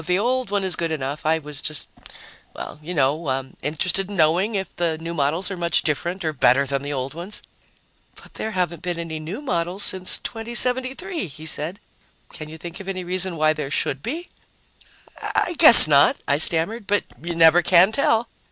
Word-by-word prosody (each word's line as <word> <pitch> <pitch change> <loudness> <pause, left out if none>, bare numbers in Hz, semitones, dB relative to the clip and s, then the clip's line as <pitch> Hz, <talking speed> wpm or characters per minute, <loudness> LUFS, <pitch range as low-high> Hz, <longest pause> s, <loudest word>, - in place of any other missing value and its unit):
The 160 - -16
the - - +3
old 250 +2 -1
one 205 -1 -1
is 185 -3 +2
good 165 0 -2
enough. 145 -1 -4
I 160 +1 +3
was 150 -2 -6
just 155 -2 -3 0.7
well, - - -8
you 160 +4 -8
know, 135 -3 -1
interested 180 +6 -1
in 205 - -6
knowing 175 +7 +2
if 190 -1 -4
the 165 -2 0
new 165 +1 -6
models 165 +5 -1
are - - -3
much 170 -2 +1
different 170 +4 -2
or 155 - -1
better 135 0 +3
than 140 0 -2
the 145 +1 -5
old 135 0 -4
ones." 175 +6 -6 0.7
"But - - -16
there 220 - -4
haven't 180 -5 -2
been 175 -1 -3
any 165 -2 -5
new 180 - -7
models 180 -4 -1
since 185 -1 +2
2073," 255 - -1
he 155 +1 -11
said. 160 +4 -2 0.5
"Can 155 0 -8
you 160 - -10
think 170 +1 -9
of 195 - -10
any 185 -1 -4
reason 185 0 -2
why 155 0 +3
there 150 -3 -5
should 140 -1 -1
be?" 325 - -5 0.9
"I 355 - -1
guess 305 - +10
not," 145 -1 +4
I 140 - +1
stammered. 195 +8 0
"But 205 0 +1 0.2
you 170 0 -4
never 165 +1 +6
can 180 +3 +5
tell." 225 -2 +1
170 Hz, 195 wpm, -22 LUFS, 155-195 Hz, 0.9 s, guess